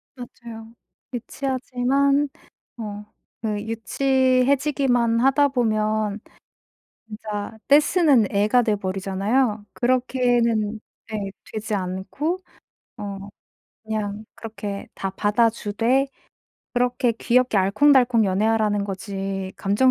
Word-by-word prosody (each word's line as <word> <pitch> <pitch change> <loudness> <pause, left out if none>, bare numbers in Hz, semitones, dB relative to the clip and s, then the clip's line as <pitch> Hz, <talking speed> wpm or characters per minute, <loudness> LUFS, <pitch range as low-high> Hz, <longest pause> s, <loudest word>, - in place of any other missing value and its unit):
맞아요. 235 -2 -10 0.4
유치하지만 270 +3 0 0.5
어 210 -2 -6 0.4
그 215 -2 -1
유치해지기만 255 +1 +2
하다 270 +2 +4
보면 215 -4 0 0.9
진짜 210 0 -6
떼쓰는 290 - +5
애가 210 +5 +3
돼 220 -3 +1
버리잖아요. 200 +4 -1
그렇게는 245 -3 +1 0.4
예. 200 -2 -3 0.2
되지 215 0 -3
않고 190 - -2 0.6
어 200 -1 -5 0.7
그냥 215 -1 -4
그렇게 210 -3 -6
다 195 - -3
받아 215 +4 +2
주되 230 +5 0 0.7
그렇게 245 0 +1
귀엽게 245 0 +2
알콩달콩 235 +3 +4
연애하라는 210 +1 +1
거지 195 -1 -4
감정 205 +7 +3
225 Hz, 215 characters per minute, -23 LUFS, 205-255 Hz, 0.9 s, 떼쓰는